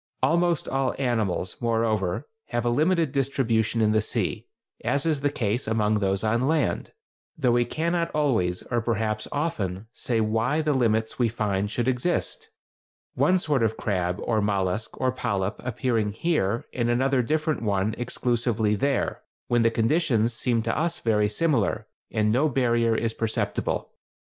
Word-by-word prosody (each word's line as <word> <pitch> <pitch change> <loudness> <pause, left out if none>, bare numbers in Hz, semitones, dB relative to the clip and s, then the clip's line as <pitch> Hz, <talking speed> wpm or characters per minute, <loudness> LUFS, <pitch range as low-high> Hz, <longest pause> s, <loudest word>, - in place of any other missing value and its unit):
] - - -23
Almost 170 -1 +2
all 135 -1 0
animals, 110 -9 -1
moreover, 115 -2 0 0.2
have 120 -1 -2
a 120 - +2
limited 160 +3 +2
distribution 120 -5 +1
in 105 -1 +3
the 110 0 +3
sea, - - -2 0.4
as 140 +5 0
is 155 -4 +1
the 145 - +2
case 120 -4 -1
among 110 -1 +1
those 95 0 0
on 115 +4 +1
land, 155 0 0 0.5
though 130 -5 +2
we 120 0 +3
cannot 170 +3 -1
always, 110 -13 0
or 120 -1 +1
perhaps 110 -1 -1
often, 105 - -2
say 115 -2 -1
why 115 +7 +1
the 155 -1 +1
limits 110 -3 +1
we 120 -2 +3
find 105 -3 -1
should 120 +3 -1
exist; 175 - -1 0.6
one 185 - +3
sort 150 -7 0
of 110 -1 +1
crab, 90 -4 -1
or 110 -2 +1
mollusk, 100 +1 -1
or 130 - +2
polyp, 100 -5 -2
appearing 115 -4 -1
here 115 - 0
and 120 -1 0
another 130 +2 +2
different 155 +4 0
one 100 -1 0
exclusively 120 -3 0
there, 135 +5 0 0.3
when 120 -1 +3
the 115 - +4
conditions 115 -1 +1
seem 115 -1 0
to - - -1
us 170 +2 0
very 105 -7 +1
similar, 115 -4 +1 0.2
and 105 -1 +1
no 140 +7 +3
barrier 120 -3 +2
is 115 0 -1
perceptible. 115 -1 -2
115 Hz, 160 wpm, -25 LUFS, 110-135 Hz, 0.6 s, the